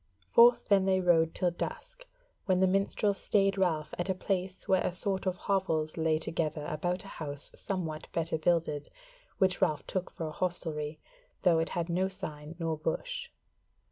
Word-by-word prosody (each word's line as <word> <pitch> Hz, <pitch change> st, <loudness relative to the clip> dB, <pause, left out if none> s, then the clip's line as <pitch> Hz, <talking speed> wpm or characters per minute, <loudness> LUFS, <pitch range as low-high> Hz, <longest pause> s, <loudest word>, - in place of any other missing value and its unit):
Forth 240 Hz, -, +6 dB
then 195 Hz, -2 st, +5 dB
they 190 Hz, -1 st, +3 dB
rode 165 Hz, -3 st, +3 dB
till 180 Hz, -1 st, +1 dB
dusk, -, -, -6 dB, 0.4 s
when 185 Hz, -2 st, +3 dB
the 190 Hz, -, +5 dB
minstrel 195 Hz, +2 st, +2 dB
stayed 195 Hz, 0 st, +2 dB
Ralph 165 Hz, -6 st, 0 dB
at 175 Hz, +2 st, -1 dB
a 190 Hz, -, +1 dB
place 185 Hz, 0 st, -2 dB
where 190 Hz, -1 st, +4 dB
a -, -, 0 dB
sort 190 Hz, +1 st, 0 dB
of 185 Hz, -1 st, 0 dB
hovels 165 Hz, -6 st, 0 dB
lay 160 Hz, -1 st, +2 dB
together 155 Hz, -1 st, -2 dB
about 175 Hz, +4 st, -1 dB
a -, -, -11 dB
house 145 Hz, -2 st, -6 dB
somewhat 165 Hz, -6 st, -4 dB
better 165 Hz, -1 st, -1 dB
builded, 155 Hz, -3 st, +1 dB, 0.5 s
which 190 Hz, -2 st, +2 dB
Ralph 150 Hz, -2 st, +1 dB
took 185 Hz, -1 st, -2 dB
for 165 Hz, -, -6 dB
a 155 Hz, -, -4 dB
hostelry, 155 Hz, -3 st, -2 dB, 0.4 s
though 170 Hz, -3 st, +5 dB
it 165 Hz, -, 0 dB
had 170 Hz, -1 st, 0 dB
no 180 Hz, +2 st, +1 dB
sign 155 Hz, -4 st, -7 dB
nor 165 Hz, -2 st, -1 dB
bush. -, -, -3 dB
175 Hz, 175 wpm, -31 LUFS, 160-190 Hz, 0.5 s, Forth